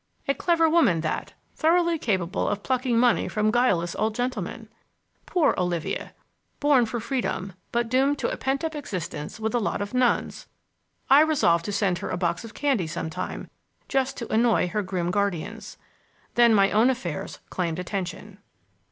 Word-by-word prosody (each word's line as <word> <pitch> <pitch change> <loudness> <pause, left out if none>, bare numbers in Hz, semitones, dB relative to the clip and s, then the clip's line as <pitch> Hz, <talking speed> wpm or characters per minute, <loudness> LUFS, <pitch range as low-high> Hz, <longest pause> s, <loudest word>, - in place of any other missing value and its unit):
A 275 - +3
clever 330 +1 +2
woman, 315 - +3
that! 155 - -3 0.2
Thoroughly 340 0 +2
capable 190 -7 -1
of 205 0 -3
plucking 255 -2 0
money 240 0 +3
from 215 0 +1
guileless 195 -9 +1
old 215 0 0
gentlemen! 250 +2 -3 0.6
Poor 350 -4 +3
Olivia! 175 -3 -2 0.4
born 280 -5 +4
for 235 +2 -3
freedom, 230 -6 -3 0.2
but 235 0 0
doomed 270 +4 +2
to - - -1
a - - -2
pent 270 +2 -2
up 320 0 -2
existence 185 - -5
with 220 +1 -2
a 240 - +2
lot 215 - -1
of 205 +2 -4
nuns! 250 -1 0 0.6
I 275 +2 +7
resolved 265 - +3
to - - -2
send 195 -3 0
her - - -5
a - - -2
box 175 +1 -1
of 230 0 -10
candy 265 - 0
sometime, 160 0 -5 0.4
just 270 0 0
to 235 - -5
annoy 225 -5 +3
her 210 +3 -1
grim 180 -3 -2
guardians. 200 +2 -2 0.6
Then 235 -2 +5
my 195 -1 +4
own 220 +4 +4
affairs 185 - -3
claimed 170 -3 -2
attention. 190 +2 -5
220 Hz, 165 wpm, -25 LUFS, 185-260 Hz, 0.6 s, I